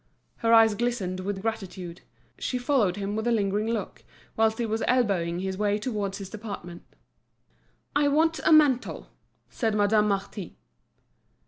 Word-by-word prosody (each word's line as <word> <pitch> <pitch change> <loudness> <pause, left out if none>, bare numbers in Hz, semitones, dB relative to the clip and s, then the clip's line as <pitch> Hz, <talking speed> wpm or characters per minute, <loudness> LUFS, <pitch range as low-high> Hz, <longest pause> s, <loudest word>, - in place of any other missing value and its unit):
Her 230 - +1
eyes 225 -1 +7
glistened 205 -5 -2
with 190 +1 -4
gratitude; 190 -6 -5 0.4
she 255 - -2
followed 245 -7 +1
him 205 0 -3
with 220 +2 -2
a - - +3
lingering 210 -1 0
look, 225 -4 -4 0.3
whilst 220 0 +2
he 235 - -1
was 220 0 -2
elbowing 185 -9 +1
his 190 0 -3
way 205 -1 +1
towards 205 -4 -3
his 195 - -7
department. 200 -5 -7 1.1
"I 290 0 +3
want 320 +3 +2
a - - +3
mantle," 290 -5 +3 0.4
said 225 -4 -1
Madame 210 +1 +3
Marty. 200 -2 -3
210 Hz, 145 wpm, -26 LUFS, 195-235 Hz, 1.1 s, eyes